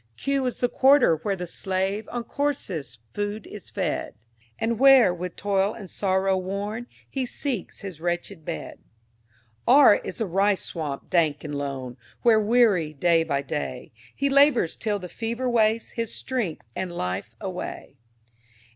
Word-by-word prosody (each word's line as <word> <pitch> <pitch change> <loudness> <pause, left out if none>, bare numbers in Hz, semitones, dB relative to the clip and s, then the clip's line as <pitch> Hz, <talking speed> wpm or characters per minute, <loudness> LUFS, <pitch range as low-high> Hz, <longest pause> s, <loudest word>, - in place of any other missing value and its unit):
Q 275 -2 0
is 250 - -4
the 245 - +4
Quarter, 260 - +5
where 200 +4 -2
the 180 -1 -5
slave 190 +4 -2
On 240 0 -3
coarsest 190 - -3 0.2
food 205 +1 -3
is 210 - -10
fed, 185 -6 -2 0.4
And 230 0 -1
where, 265 -8 +7
with 180 0 -6
toil 200 +1 0
and 200 -5 -9
sorrow 190 -1 +1
worn, 200 +5 -4 0.2
He 265 -2 -3
seeks 250 -6 -4
his 185 -6 -8
wretched 175 0 -3
bed. 80 - -6 0.9
R 260 -4 +8
is - - -7
the 225 - 0
"Rice 195 +2 +1
swamp, 150 -5 -5
dank 160 -4 +2
and 150 -1 -5
lone," 135 -3 -4 0.3
Where, 230 -2 +6
weary, 210 -8 +3
day 165 +2 +3
by 140 -3 -1
day, 135 -3 -4 0.2
He 280 - 0
labors 275 - +4
till 210 -2 -1
the 180 -2 -7
fever 235 +7 -3
wastes 225 -1 +2
His 230 -2 -3
strength 235 -11 -3
and 185 -2 -3
life 95 - -4
away. - - -6
200 Hz, 155 wpm, -25 LUFS, 170-235 Hz, 0.9 s, R